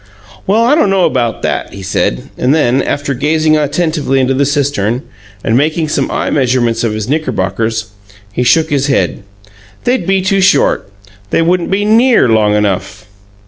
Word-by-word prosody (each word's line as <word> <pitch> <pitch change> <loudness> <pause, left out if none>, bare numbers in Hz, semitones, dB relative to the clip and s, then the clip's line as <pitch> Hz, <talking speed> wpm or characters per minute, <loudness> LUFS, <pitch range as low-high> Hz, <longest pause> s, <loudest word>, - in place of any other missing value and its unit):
"Well, 215 +4 +3
I 245 +5 +3
don't 300 -10 +3
know 195 -2 +3
'bout 120 -3 -2
that," - - -3
he 100 - -9
said, 90 -9 -2
and 130 +4 +1
then, 135 -3 +2
after 145 0 -2
gazing 155 +3 +1
attentively 150 -2 0
into 130 0 +1
the 140 +1 +1
cistern 135 -5 -1 0.4
and 115 - +1
making 155 +4 0
some - - -1
eye - - -2
measurements 125 -4 +1
of 115 -2 0
his 110 0 -4
knickerbockers, 110 - -2 0.4
he - - -2
shook 160 +6 +2
his 140 -1 +1
head. 135 -5 0 0.6
"They'd 250 -2 0
be 195 -1 +1
too 195 +1 +1
short. 145 - +2 0.4
They 165 - +1
wouldn't 175 +1 0
be 200 +2 0
NEAR 230 - +4
long 105 -2 +2
enough!" 100 0 -2
140 Hz, 170 wpm, -13 LUFS, 115-165 Hz, 0.6 s, NEAR